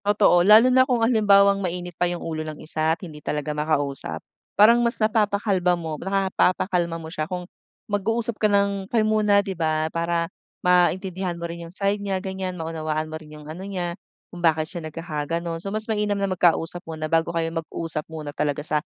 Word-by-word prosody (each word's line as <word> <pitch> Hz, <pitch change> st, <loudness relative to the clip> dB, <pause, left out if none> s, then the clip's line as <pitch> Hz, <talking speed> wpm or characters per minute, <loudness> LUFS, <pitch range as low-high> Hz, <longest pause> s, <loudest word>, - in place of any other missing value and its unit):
Totoo, 205 Hz, -4 st, +4 dB
lalo 220 Hz, +7 st, +7 dB
na 260 Hz, -, +6 dB
kung 255 Hz, -1 st, +2 dB
halimbawang 200 Hz, -4 st, +4 dB
mainit 180 Hz, -1 st, -4 dB
pa 175 Hz, +1 st, 0 dB
'yung 175 Hz, 0 st, -5 dB
ulo 160 Hz, -1 st, -3 dB
ng 155 Hz, -1 st, -6 dB
isa 160 Hz, +1 st, -1 dB
at -, -, -49 dB
hindi 150 Hz, -3 st, -10 dB
talaga 150 Hz, 0 st, -3 dB
makausap. 145 Hz, -, -1 dB, 0.4 s
Parang 230 Hz, +4 st, +7 dB
mas 235 Hz, +1 st, 0 dB
napapakalma 205 Hz, -4 st, +1 dB
mo, 165 Hz, -2 st, -5 dB
napapakalma 185 Hz, -2 st, +1 dB
mo 160 Hz, 0 st, -9 dB
siya 155 Hz, 0 st, -3 dB
kung 180 Hz, -1 st, -4 dB, 0.4 s
mag-uusap 220 Hz, +2 st, -1 dB
ka 215 Hz, -, +4 dB
ng 200 Hz, -1 st, +1 dB
kayo 225 Hz, -2 st, +2 dB
muna 210 Hz, -2 st, +3 dB
'di 195 Hz, -, -3 dB
ba. 160 Hz, -2 st, -1 dB
Para 170 Hz, 0 st, 0 dB, 0.4 s
maintindihan 180 Hz, 0 st, +2 dB
mo 170 Hz, -, -5 dB
rin 170 Hz, 0 st, -7 dB
'yung -, -, -8 dB
side 200 Hz, +1 st, 0 dB
niya 195 Hz, -1 st, -1 dB
ganiyan, 190 Hz, -1 st, -4 dB
maunawaan 155 Hz, -1 st, -3 dB
mo -, -, -3 dB
rin 155 Hz, -, -14 dB
'yung 150 Hz, -, -12 dB
ano 155 Hz, +4 st, -8 dB
niya, 185 Hz, -3 st, -3 dB, 0.4 s
kung 175 Hz, -, -8 dB
bakit 160 Hz, 0 st, +1 dB
siya 175 Hz, -, -5 dB
nagkakagano'n. 165 Hz, +1 st, -4 dB
So 195 Hz, -, -4 dB
mas 215 Hz, +2 st, -3 dB
mainam 210 Hz, -2 st, 0 dB
na 200 Hz, -, 0 dB
magkausap 175 Hz, -2 st, +1 dB
muna 155 Hz, -1 st, -4 dB
bago 165 Hz, +1 st, +1 dB
kayo 165 Hz, -1 st, -2 dB
mag-usap 165 Hz, -1 st, -3 dB
muna 155 Hz, -2 st, -6 dB
talaga 145 Hz, 0 st, -1 dB
sa 150 Hz, -1 st, +1 dB
175 Hz, 190 wpm, -24 LUFS, 160-200 Hz, 0.4 s, lalo